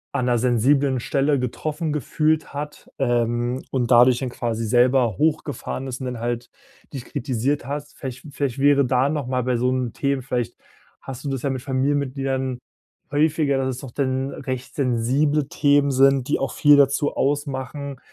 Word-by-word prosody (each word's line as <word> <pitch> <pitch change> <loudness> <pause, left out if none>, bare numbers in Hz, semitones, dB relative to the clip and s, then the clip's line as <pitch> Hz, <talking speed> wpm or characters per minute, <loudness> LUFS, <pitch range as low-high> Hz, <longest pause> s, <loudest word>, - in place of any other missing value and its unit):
an 130 -3 0
'ner 120 -1 +2
sensiblen 130 +3 +2
Stelle 140 +3 +1
getroffen 150 +5 -3
gefühlt 155 +2 0
hat, 150 +1 -6
ähm, 120 0 0
und 125 -3 0
dadurch 120 0 +6
dann 130 - -3
quasi 115 -2 -3
selber 120 -1 +3
hochgefahren 145 -4 -1
ist 130 +1 -6
und 130 - -4
dann 125 -2 -5
halt 120 +1 -3 0.4
dich 130 -3 -6
kritisiert 130 +2 -2
hast. 145 +1 -6
Vielleicht 130 0 -7
vielleicht 135 -3 -2
wäre 140 0 +4
da 130 +2 +2
noch 150 -3 -2
mal 130 0 0
bei 125 -1 0
so 125 +2 +1
'n 130 -2 -1
Themen 140 -1 -1
vielleicht 125 -3 -2 0.5
hast 135 0 -8
du - - -1
das 135 -2 -3
ja 140 - 0
mit 130 -2 -3
Familienmitgliedern 135 -1 -1 0.5
häufiger, 150 -1 +2
dass 130 0 0
es - - -8
doch 135 - -8
dann 130 0 -1
recht 130 -2 -6
sensible 135 +3 +1
Themen 145 -1 +3
sind, 135 -1 +4
die - - +2
auch 135 - -2
viel 145 -1 +6
dazu 140 +1 +2
ausmachen, 140 -1 -2
135 Hz, 170 wpm, -23 LUFS, 125-145 Hz, 0.5 s, dadurch